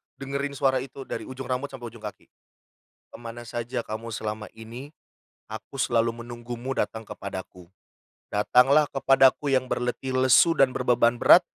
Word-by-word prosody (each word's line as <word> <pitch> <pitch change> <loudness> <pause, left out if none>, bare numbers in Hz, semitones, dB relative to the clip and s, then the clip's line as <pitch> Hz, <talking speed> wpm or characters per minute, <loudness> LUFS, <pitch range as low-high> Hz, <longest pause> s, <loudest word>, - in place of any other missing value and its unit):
dengerin 140 +1 -4
suara 135 -2 +2
itu 135 +1 -8
dari - - -6
ujung 130 0 -7
rambut 130 +2 -1
sampai 120 -5 -8
ujung 115 - -13
kaki, 105 -2 -9 0.8
"Kemana 120 0 -9
saja 120 +1 -3
kamu 115 +1 -6
selama 105 0 -4
ini? 115 +6 -10 0.6
Aku 110 +4 -7
selalu 115 -1 +1
menunggumu 120 +2 -6
datang 110 0 -2
kepadaku. 95 -2 -8 0.6
Datanglah 130 +8 +4
kepadaku 135 +1 +4
yang 130 -1 0
berletih 125 +2 -2
lesu 130 +6 +6
dan 130 -2 +4
berbeban 120 -1 +3
berat. 180 - +9
125 Hz, 140 wpm, -26 LUFS, 115-135 Hz, 0.8 s, berat